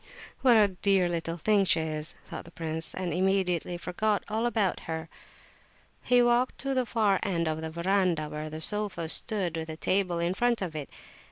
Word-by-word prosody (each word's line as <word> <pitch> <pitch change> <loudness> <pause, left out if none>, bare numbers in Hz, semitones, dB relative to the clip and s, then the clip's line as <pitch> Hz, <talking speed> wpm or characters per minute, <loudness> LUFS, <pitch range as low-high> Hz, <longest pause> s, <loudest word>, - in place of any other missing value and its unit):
"What 245 -4 +5
a 210 -2 +5
dear 190 0 +2
little 165 -1 -3
thing 205 +4 +2
she 175 -3 +2
is," 155 -1 -3
thought - - -8
the - - -12
prince, 160 -2 -2
and 180 -3 -3
immediately 180 -1 0
forgot 205 +4 -1
all 225 +3 0
about 215 -6 0
her. 160 0 -4 0.9
He 245 -1 +3
walked 240 +1 +1
to 275 0 -2
the 255 -2 0
far 210 -4 +1
end 170 -5 -1
of 160 0 -2
the 160 - -4
verandah, 170 -1 0
where 150 +1 -6
the 155 +1 -7
sofa 200 -4 -1
stood, 190 -3 +5
with 160 0 -5
a 160 - -6
table 185 -1 0
in 170 +1 0
front 240 +3 +1
of 165 -4 -6
it. 150 -2 -5
180 Hz, 190 wpm, -28 LUFS, 160-210 Hz, 0.9 s, What